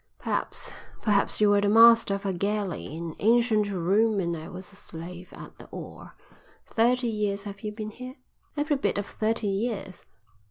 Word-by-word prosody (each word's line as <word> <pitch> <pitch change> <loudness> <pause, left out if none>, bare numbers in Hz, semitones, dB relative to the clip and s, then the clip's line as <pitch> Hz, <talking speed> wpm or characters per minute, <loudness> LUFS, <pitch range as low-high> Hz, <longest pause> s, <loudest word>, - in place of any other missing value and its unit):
Perhaps, - - -2 0.3
perhaps 205 -2 +2
you 210 -1 +5
were 205 0 +4
the 200 - +2
master 230 -1 +7
of 200 - -7
a 195 - 0
galley 200 0 -2
in 165 -1 -5
ancient 225 -1 +3
Rome 200 +4 +2
and 170 -2 -1
I 160 0 -7
was 185 +2 -9
a - - -16
slave 175 -1 -9
at - - -12
the - - -11
oar. - - -10 0.5
Thirty 245 +2 +2
years 205 -3 -1
have 200 -1 -8
you 210 - -4
been 215 0 -6
here?" 255 +3 -9 0.4
"Every 295 0 +1
bit 270 - 0
of 205 - -1
thirty 220 +1 -1
years." 200 -1 -2
205 Hz, 175 wpm, -27 LUFS, 195-225 Hz, 0.5 s, master